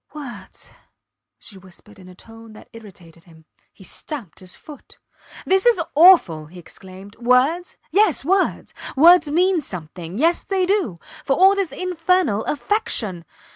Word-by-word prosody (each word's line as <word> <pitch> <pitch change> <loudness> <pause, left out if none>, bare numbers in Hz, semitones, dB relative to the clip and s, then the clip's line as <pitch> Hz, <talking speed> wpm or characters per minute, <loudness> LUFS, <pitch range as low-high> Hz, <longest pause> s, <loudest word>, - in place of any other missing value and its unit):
Words! 240 -10 -11 0.6
she 190 - -14
whispered 190 +3 -16
in 185 - -15
a 180 - -15
tone 225 +2 -15
that 215 - -16
irritated 180 -7 -16
him. 160 -2 -20 0.3
He 195 - -18
stamped 230 - -5
his 185 -1 -12
foot. 300 -3 -15 0.5
This 380 +4 +1
is 470 -6 +3
awful! 285 - +5
he 180 +4 -15
exclaimed. 190 +3 -14
Words? 260 +9 +1
Yes, 390 -9 +1
words. 380 +3 -1 0.2
Words 335 +1 +6
mean 355 +3 +1
something 175 - -9
yes 330 +6 +1
they 380 -2 -1
do 370 - -1 0.3
for 275 - 0
all 380 +4 +5
this 395 -4 -3
infernal 360 - -1
affectation. 225 - -2
250 Hz, 140 wpm, -20 LUFS, -, 0.6 s, Words